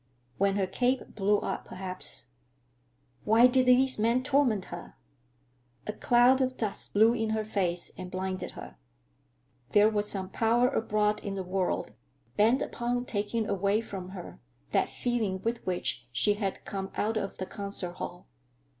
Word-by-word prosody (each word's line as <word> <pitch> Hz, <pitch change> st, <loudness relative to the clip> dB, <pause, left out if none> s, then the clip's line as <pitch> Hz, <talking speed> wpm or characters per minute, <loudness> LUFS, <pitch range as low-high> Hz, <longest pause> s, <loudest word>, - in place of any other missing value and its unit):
When 195 Hz, 0 st, +3 dB
her 200 Hz, -1 st, +1 dB
cape 250 Hz, +6 st, -1 dB
blew 205 Hz, 0 st, +2 dB
up, -, -, -3 dB
perhaps—Why 125 Hz, -, -2 dB
did 255 Hz, 0 st, +4 dB
these 255 Hz, -1 st, +4 dB
men 235 Hz, +4 st, +2 dB
torment 260 Hz, -8 st, +2 dB
her? 175 Hz, -, -8 dB, 0.9 s
A 210 Hz, -, -3 dB
cloud 245 Hz, +4 st, +4 dB
of 255 Hz, 0 st, 0 dB
dust 215 Hz, -3 st, -3 dB
blew 220 Hz, +3 st, +6 dB
in 225 Hz, -2 st, -1 dB
her 220 Hz, 0 st, 0 dB
face 180 Hz, -5 st, -1 dB
and 185 Hz, -1 st, -6 dB
blinded 185 Hz, 0 st, -3 dB
her. -, -, -9 dB, 1.0 s
There 210 Hz, +1 st, +6 dB
was 210 Hz, -1 st, 0 dB
some 190 Hz, -2 st, -3 dB
power 235 Hz, +4 st, +3 dB
abroad 210 Hz, -4 st, 0 dB
in 200 Hz, -2 st, -3 dB
the 190 Hz, -, -3 dB
world 185 Hz, 0 st, -1 dB, 0.4 s
bent 230 Hz, +6 st, +4 dB
upon 245 Hz, +1 st, -2 dB
taking 215 Hz, 0 st, -1 dB
away 200 Hz, +1 st, +1 dB
from 190 Hz, -5 st, -6 dB
her 180 Hz, -, -9 dB, 0.3 s
that -, -, +2 dB
feeling 225 Hz, -6 st, -1 dB
with 230 Hz, +1 st, -2 dB
which 175 Hz, -9 st, -1 dB
she 165 Hz, -, +2 dB
had 200 Hz, -2 st, -3 dB
come 195 Hz, -1 st, -4 dB
out 220 Hz, +2 st, 0 dB
of 200 Hz, -3 st, -3 dB
the 185 Hz, -, -3 dB
concert 200 Hz, -2 st, -4 dB
hall. -, -, -6 dB
205 Hz, 155 wpm, -29 LUFS, 185-230 Hz, 1.0 s, blew